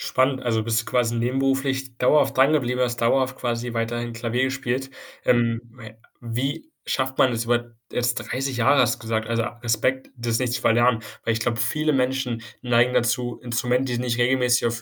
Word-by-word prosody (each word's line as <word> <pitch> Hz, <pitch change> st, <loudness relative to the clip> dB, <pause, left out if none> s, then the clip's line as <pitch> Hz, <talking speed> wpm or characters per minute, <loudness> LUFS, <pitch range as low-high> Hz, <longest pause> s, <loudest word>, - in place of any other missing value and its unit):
Spannend. 130 Hz, 0 st, +2 dB
Also, 110 Hz, -2 st, 0 dB
bist 115 Hz, +1 st, +1 dB
du -, -, -15 dB
quasi 120 Hz, -2 st, +1 dB
nebenberuflich 130 Hz, +1 st, -1 dB
dauerhaft 135 Hz, +1 st, +3 dB
dran 135 Hz, +3 st, +5 dB
geblieben, 125 Hz, -4 st, 0 dB
hast 120 Hz, -2 st, 0 dB
dauerhaft 130 Hz, +2 st, +2 dB
quasi 120 Hz, -1 st, -3 dB
weiterhin 120 Hz, +1 st, -2 dB
Klavier 115 Hz, +2 st, -1 dB
gespielt? 130 Hz, 0 st, -2 dB, 0.4 s
Ähm, 115 Hz, -1 st, +2 dB, 0.2 s
ja, 110 Hz, -, -9 dB, 0.3 s
wie 135 Hz, -, -3 dB
schafft 130 Hz, 0 st, -1 dB
man 130 Hz, -, +4 dB
es 115 Hz, 0 st, -1 dB
über 120 Hz, 0 st, -1 dB, 0.2 s
jetzt 120 Hz, 0 st, 0 dB
30 135 Hz, +1 st, -3 dB
Jahre 135 Hz, +4 st, +4 dB
hast 120 Hz, -1 st, +2 dB
du -, -, -21 dB
gesagt, 110 Hz, 0 st, -2 dB
also, 115 Hz, 0 st, 0 dB, 0.2 s
Respekt, 130 Hz, +3 st, 0 dB
das 120 Hz, -2 st, -1 dB
nicht 125 Hz, -1 st, -1 dB
zu 120 Hz, -, -2 dB
verlernen? 120 Hz, 0 st, +3 dB, 0.2 s
Weil 115 Hz, -, +2 dB
ich 110 Hz, -, -3 dB
glaube, 115 Hz, 0 st, 0 dB
viele 150 Hz, +6 st, +1 dB
Menschen 130 Hz, -3 st, 0 dB, 0.2 s
neigen 120 Hz, 0 st, +3 dB
dazu, 120 Hz, 0 st, 0 dB
Instrumente, 125 Hz, +2 st, 0 dB
die 120 Hz, -, -1 dB
nicht 120 Hz, -1 st, -1 dB
regelmäßig 125 Hz, 0 st, +2 dB
auf 115 Hz, -1 st, -3 dB
120 Hz, 185 wpm, -23 LUFS, 115-130 Hz, 0.4 s, dran